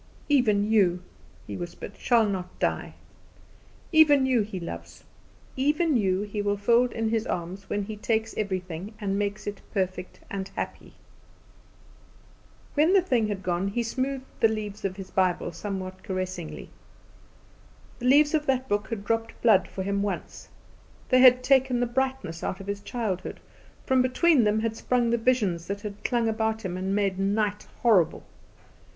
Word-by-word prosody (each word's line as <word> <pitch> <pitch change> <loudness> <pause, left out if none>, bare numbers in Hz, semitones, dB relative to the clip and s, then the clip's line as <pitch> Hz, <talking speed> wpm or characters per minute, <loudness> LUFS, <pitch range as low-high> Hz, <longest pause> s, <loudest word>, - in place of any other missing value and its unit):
"Even 225 -8 +3
you," 180 -5 +3 0.4
he 100 - -6
whispered, 175 - -7
"shall 235 -3 +3
not 185 -3 -4
die. - - -2 1.0
Even 295 -4 +6
you 255 -3 +3
He 200 -2 -4
loves. 85 - -8 0.5
Even 300 +3 +2
you 195 -3 +1
He 210 0 -3
will 205 0 0
fold 235 +4 +3
in 225 -1 -1
His 225 +1 0
arms 180 +3 -4
when 205 0 -1
He 215 +2 -6
takes 220 +1 -1
everything 190 -1 -4
and 200 -2 -1
makes 205 0 -2
it 205 -1 -5
perfect 185 -2 -3
and 195 -1 -4
happy." - - -5 1.8
When 310 +5 +3
the 390 -3 +5
thing 240 -10 +1
had 200 -2 -4
gone 180 +1 0
he 235 +4 -1
smoothed 260 +3 -2
the 225 - +6
leaves 215 -1 -4
of 190 -1 -2
his 195 -1 -9
Bible 185 -2 +1
somewhat 185 0 -5
caressingly. 185 -3 -5 1.3
The 250 - -2
leaves 290 +3 +5
of 300 -1 +1
that 260 -1 +1
book 205 -1 0
had 215 -4 -4
dropped 225 0 -2
blood 220 -5 +5
for 190 - -5
him 200 +1 -1
once; 200 -1 -4 0.6
they 255 - +5
had 255 0 +7
taken 265 -1 +3
the 245 - +2
brightness 260 -9 -2
out 190 - -3
of 195 - -8
his 200 0 -4
childhood; 205 -6 -4 0.5
from 260 -1 +3
between 255 +1 +3
them 210 +1 +2
had 225 0 -1
sprung 240 0 +1
the 235 - +2
visions 205 -9 +1
that 200 +1 -4
had 205 -1 -7
clung 235 -2 +1
about 220 -1 -1
him 180 -1 -3
and 190 +2 -1
made 195 -2 0
night 205 +1 0 0.2
horrible. 210 -9 +3
210 Hz, 165 wpm, -26 LUFS, 190-245 Hz, 1.8 s, had